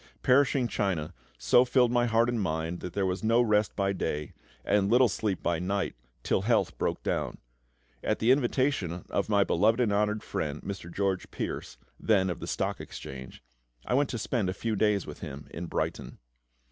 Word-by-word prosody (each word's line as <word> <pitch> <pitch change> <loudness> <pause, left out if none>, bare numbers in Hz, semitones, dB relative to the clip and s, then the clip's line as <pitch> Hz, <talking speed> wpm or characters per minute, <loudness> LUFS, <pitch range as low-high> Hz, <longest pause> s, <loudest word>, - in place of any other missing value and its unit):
Perishing 130 -1 +4
China 95 -7 -1 0.2
so 120 - +5
filled 125 -1 +3
my 120 0 +2
heart 115 +1 +3
and 120 -2 0
mind 80 -1 -2
that 90 - -6
there 100 -1 0
was 95 +3 -2
no 115 +2 +4
rest 105 -3 +2
by 100 -1 +1
day, 75 -5 -3 0.3
and 100 -1 +2
little 125 +2 +6
sleep 100 -3 -2
by 85 -1 +1
night, 95 +2 -1 0.3
till - - +1
health - - +1
broke - - -1
down. - - -2 0.7
At - - +1
the 115 +3 +3
invitation 130 - +1
of 100 - 0
my 100 -2 +4
beloved 110 +6 +2
and 115 -5 +2
honoured 105 +1 +1
friend, 75 0 -3
Mr. 95 -3 -6
George 95 0 -1
Pearse - - -5 0.2
(then 95 -4 +2
of 85 - -5
the - - -6
Stock - - -2
Exchange), 65 -2 -9 0.4
I - - -1
went 140 +2 +2
to 120 - -3
spend 110 -3 -1
a 95 - -3
few 110 +1 -2
days 105 -2 +2
with - - -9
him 70 +2 -7
in 85 +1 -5
Brighton. - - -3
100 Hz, 185 wpm, -29 LUFS, 90-115 Hz, 0.7 s, little